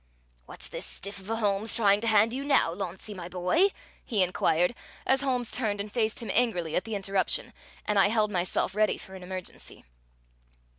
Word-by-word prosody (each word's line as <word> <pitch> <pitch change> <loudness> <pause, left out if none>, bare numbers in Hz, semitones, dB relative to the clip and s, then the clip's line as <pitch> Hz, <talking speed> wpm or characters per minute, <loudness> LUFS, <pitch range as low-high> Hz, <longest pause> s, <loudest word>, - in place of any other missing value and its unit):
"What's - - -4
this - - -4
stiff 200 +1 -4
of 190 +2 -12
a 225 - 0
Holmes 210 0 +1
trying 205 -2 +4
to 230 - -1
hand 220 +1 +4
you 270 +2 -3
now, 280 - +3
Launcie 190 +2 -5
my 175 -2 -7
boy?" 185 - +3 0.4
he 210 -6 +2
inquired, 180 +1 +2 0.3
as 265 0 +3
Holmes 250 -4 -1
turned 210 -5 -1
and 205 +1 -4
faced 220 -2 0
him - - -3
angrily 180 -10 +1
at - - 0
the 225 -1 -3
interruption 195 -1 -1 0.3
and 210 -1 +2
I 195 - +6
held 215 0 +1
myself 180 0 0
ready 215 +1 +2
for 190 - -11
an 190 - -9
emergency. 185 0 -7
205 Hz, 190 wpm, -28 LUFS, 185-225 Hz, 0.4 s, I